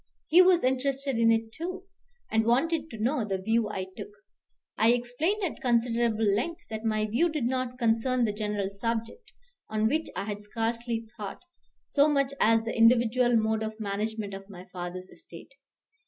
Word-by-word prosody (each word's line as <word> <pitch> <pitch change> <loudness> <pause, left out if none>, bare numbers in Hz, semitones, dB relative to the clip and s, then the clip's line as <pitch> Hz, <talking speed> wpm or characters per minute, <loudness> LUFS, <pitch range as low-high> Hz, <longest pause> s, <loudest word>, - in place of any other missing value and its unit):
He 345 +4 +8
was 365 -1 +5
interested 265 0 0
in 230 0 +5
it 225 0 0
too, 360 +8 -6 0.5
and 220 0 +3
wanted 315 +8 +1
to 225 - -8
know 245 +4 0
the 195 -2 -2
view 220 +3 0
I 190 -3 -3
took. - - -7 0.7
I 230 +2 +4
explained 270 - -1
at 355 - -3
considerable 235 -2 +1
length 325 - 0
that 220 0 -4
my 215 -1 +1
view 240 +11 +1
did 305 -5 -2
not 250 0 -1
concern 240 +1 +2
the 210 - -1
general 210 -2 -2
subject, 230 - -4 0.4
on 215 0 +1
which 310 +7 0
I - - -2
had 205 -1 -5
scarcely 230 +2 -3
thought, 205 - -7 0.4
so 285 +1 +3
much 280 -2 +1
as 225 +1 +4
the 230 - -4
individual 240 +1 +4
mode 220 0 +1
of 220 0 -5
management 210 0 -3
of 195 +1 -9
my 185 -2 -10
father's 180 0 -6
estate. - - -11
230 Hz, 170 wpm, -28 LUFS, 215-260 Hz, 0.7 s, He